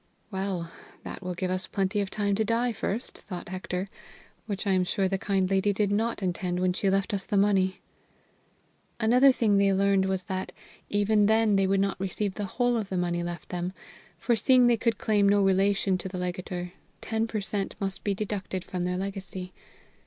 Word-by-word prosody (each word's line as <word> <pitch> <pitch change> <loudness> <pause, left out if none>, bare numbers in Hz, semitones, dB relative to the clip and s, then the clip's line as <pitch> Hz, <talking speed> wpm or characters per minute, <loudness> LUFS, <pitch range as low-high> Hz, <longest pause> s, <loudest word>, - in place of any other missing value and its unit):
"Well, 190 -3 -3 0.3
that - - -7
will 180 -1 -4
give 185 +1 -2
us 185 0 -2
plenty 195 +1 0
of 195 - -3
time 205 0 0
to 215 +2 +1
die 230 +3 +1
first," 220 +3 -4
thought 180 -3 -8
Hector, 185 0 -3 0.6
"which 200 -2 -3
I 200 - +2
am 185 -1 +3
sure 190 +1 0
the 195 0 -1
kind 195 -2 +1
lady 195 +2 +2
did 200 0 +1
not 220 0 0
intend 180 0 -1
when 180 0 +2
she 195 +2 +1
left 195 +1 +1
us 195 -1 -2
the 205 - +1
money." 195 -2 +2 1.2
Another 250 +4 +6
thing 215 -5 +2
they 200 0 +4
learned 195 0 +3
was 190 -1 -1
that, 185 +1 -4 0.4
even 205 0 +3
then, 220 -1 +4
they 195 -1 +3
would 195 0 +2
not 195 -1 -1
receive 195 +1 -2
the 205 0 -3
whole 245 +4 +1
of 210 -3 -3
the 190 - -2
money 175 -1 0
left 175 0 -6
them, 180 +1 -3 0.4
for 235 +7 +1
seeing 250 +3 +5
they 240 -1 +5
could 230 -1 0
claim 205 -2 +3
no 205 0 +4
relation 195 0 +2
to 190 - -5
the 185 - -6
legator, 180 0 -4 0.3
ten 225 0 -1
per 220 -1 -2
cent 200 -1 -3
must 195 -1 -3
be 200 -1 0
deducted 195 -3 -3
from 180 -1 -3
their 180 0 -1
legacy. 190 -1 -5
195 Hz, 200 wpm, -27 LUFS, 185-210 Hz, 1.2 s, Another